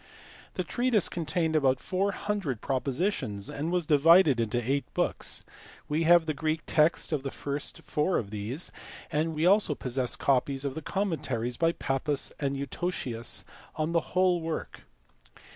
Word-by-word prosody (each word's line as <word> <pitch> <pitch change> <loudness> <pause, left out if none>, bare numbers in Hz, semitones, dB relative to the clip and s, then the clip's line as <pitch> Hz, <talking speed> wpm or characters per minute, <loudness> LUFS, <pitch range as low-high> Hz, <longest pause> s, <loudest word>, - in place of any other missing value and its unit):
The - - -1
treatise 240 -5 +2
contained 160 -1 -1
about 135 -4 +3
four 195 +7 0
hundred 195 - -2
propositions 130 - -2
and 155 +4 -3
was 180 -2 0
divided 155 -1 +6
into 115 +1 0
eight 135 +4 -1
books; - - -1 0.4
we 155 +2 0
have 170 0 +6
the 155 - -1
Greek 155 +2 -1
text 155 +1 +2
of 150 - 0
the 135 - -3
first 140 +1 -5
four 150 +5 0
of 100 -4 -4
these, 110 - -4 0.4
and 160 +1 0
we 155 +2 +1
also 195 -5 +4
possess 125 -1 -1
copies 135 +1 +1
of 140 - -1
the 160 - -5
commentaries 140 - -2
by 165 +5 +2
Pappus 135 0 -1
and 140 -1 -1
Eutocius 135 -4 -2 0.3
on 155 +1 -1
the 170 - +3 0.2
whole 180 -2 +4
work. 160 0 -5
150 Hz, 155 wpm, -28 LUFS, 135-170 Hz, 0.4 s, divided